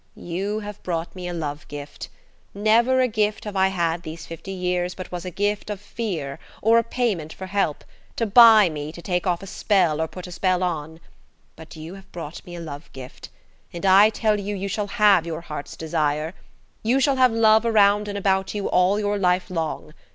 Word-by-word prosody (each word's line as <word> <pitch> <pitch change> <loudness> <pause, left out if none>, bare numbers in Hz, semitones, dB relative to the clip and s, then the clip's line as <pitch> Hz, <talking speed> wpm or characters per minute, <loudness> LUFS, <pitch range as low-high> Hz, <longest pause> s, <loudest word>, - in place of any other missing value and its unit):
"You 195 +5 -3
have 210 -1 -8
brought 170 0 -4
me 180 -1 -6
a - - -3
love 150 -3 -5
gift. 145 0 -8 0.5
Never 230 +5 +3
a 255 - +3
gift 215 -2 -1
have 210 -2 -6
I 190 0 +4
had 170 -3 -1
these 160 0 -8
fifty 165 +3 -9
years 180 -1 -2
but 185 - -8
was 180 0 -5
a - - -3
gift 205 +4 -2
of 205 -2 -4
fear 185 -10 -5 0.2
or 225 +2 +4
a - - 0
payment 210 -10 -2
for 190 - -8
help–to 195 +3 -3
buy 220 -1 +8
me 150 -2 -5
to 170 - -10
take 180 -1 -1
off 175 +1 0
a - - -6
spell 180 -5 +1
or 160 - 0
put 180 +2 -9
a 180 - -9
spell 185 +1 0
on. 160 -2 -3 0.6
But 160 0 -12
you 160 +3 -8
have 195 0 -14
brought 165 -2 -8
me 175 - -8
a - - -7
love 155 -2 -8
gift, 130 -1 -10 0.4
and 175 +2 -6
I 195 +3 +7
tell 215 -1 0
you 200 +1 -4
you 195 0 -3
shall 205 +1 -2
have 205 -5 +4
your 165 0 -4
heart's 150 -3 -7
desire. 155 0 -1 0.5
You 240 +5 +2
shall 275 0 +2
have 255 -1 +5
love 220 -1 +4
around 210 -2 +3
and 205 0 -4
about 190 0 0
you 205 - -2
all 185 +3 +3
your 205 -1 -1
life 180 0 +1
long. 160 -2 -4
185 Hz, 205 wpm, -23 LUFS, 165-210 Hz, 0.6 s, buy